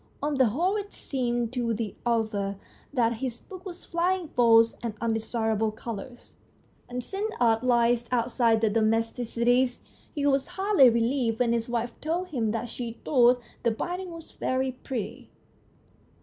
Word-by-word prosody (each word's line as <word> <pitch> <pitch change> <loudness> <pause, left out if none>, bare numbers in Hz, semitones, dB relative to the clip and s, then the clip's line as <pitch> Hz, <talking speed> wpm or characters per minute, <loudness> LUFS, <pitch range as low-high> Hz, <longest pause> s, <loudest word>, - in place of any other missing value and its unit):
On 295 +1 -1
the 260 - +6
whole 350 - +1
it 410 -1 -6
seemed 240 -3 -2
to 235 -3 0
the 215 -3 -3
author 215 -4 0 0.4
that 235 -4 +1
his 245 -1 -4
book 375 0 -11
was 360 -1 -9
flying 350 0 0
false 230 -3 +5
and 230 -3 -4
undesirable 225 -1 0
colours, 230 +2 -8 0.6
and 250 0 -4
since 410 - -3
art 225 -1 +3
lies 240 -1 +3
outside 235 -2 +2
the 220 - +3
domesticities, 235 +3 +1 0.3
he 290 -1 -1
was 275 -1 +2
hardly 385 -10 +6
re 235 0 +1
lieved 235 -2 +1
when 235 -1 +2
his 230 0 -1
wife 235 0 -1
told 345 +4 -2
him 235 -8 -1
that 225 +2 -2
she 235 0 -5
thought 245 -2 +4 0.2
the 235 - +2
binding 355 +11 -3
was 330 -1 -10
very 260 0 -1
pretty. 245 -4 -6
240 Hz, 155 wpm, -27 LUFS, 225-275 Hz, 0.6 s, the